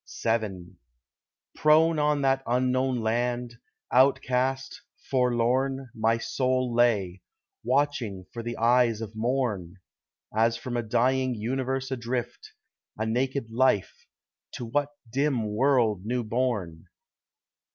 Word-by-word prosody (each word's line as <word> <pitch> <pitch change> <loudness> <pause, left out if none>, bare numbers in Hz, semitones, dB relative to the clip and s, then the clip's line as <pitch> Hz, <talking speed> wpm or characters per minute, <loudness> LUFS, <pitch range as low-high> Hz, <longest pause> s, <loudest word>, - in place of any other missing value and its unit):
VII 95 -6 -2 0.8
Prone 155 +1 +4
on 150 -1 +1
that 135 0 +2
unknown 130 +1 +1
land, 120 +1 -1 0.3
outcast, 130 0 +2 0.3
forlorn, 130 +1 +1
My 115 +1 +1
soul 130 +1 -1
lay; 105 -7 +2 0.4
watching 120 -7 0
for 115 - -5
the 120 0 -5
eyes 115 -1 +3
of 110 -1 -7
morn; 110 -7 -1 0.6
As 115 +1 +2
from 120 +1 -5
a 120 - +1
dying 125 +3 +1
universe 130 +4 -2
adrift, 130 - -4 0.4
A 110 - -1
naked 125 +1 -1
life—to 120 0 -2
what 145 +5 0 0.2
dim 135 -3 0
world 115 -5 +2
new 120 +3 -1
born? 110 -8 -2
120 Hz, 105 wpm, -27 LUFS, 115-130 Hz, 0.8 s, Prone